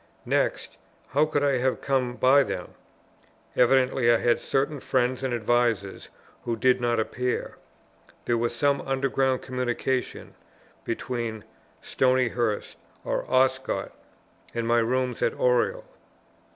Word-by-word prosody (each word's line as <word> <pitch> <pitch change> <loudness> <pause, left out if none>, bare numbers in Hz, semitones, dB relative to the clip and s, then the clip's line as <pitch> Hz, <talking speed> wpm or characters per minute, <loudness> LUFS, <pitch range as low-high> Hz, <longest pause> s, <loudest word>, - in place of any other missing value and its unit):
Next, - - -1 0.3
how 145 +3 +3
could 145 -2 0
I 140 -2 +2
have 130 +1 0
come 130 -3 -1
by 135 +3 +5
them? - - -4 0.8
Evidently, 125 -1 +3
I 115 - +5
had 120 +1 +1
certain 140 +2 -1
friends 130 0 0
and 130 -1 -2
advisers 115 -4 0 0.3
who 115 - -2
did 125 +2 +2
not 120 -1 +1
appear; 125 +3 -2 0.7
there 120 - +1
was 120 0 -1
some 140 +2 +1
underground 135 -1 0
communication 125 0 -3 0.5
between 115 -2 -4 0.4
Stonyhurst 120 -4 0 0.3
or - - -2
Oscott 130 0 +1 0.6
and 115 -1 -2
my 120 0 +3
rooms 125 +1 -1
at - - +1
Oriel. - - +1
125 Hz, 120 wpm, -26 LUFS, 120-135 Hz, 0.8 s, by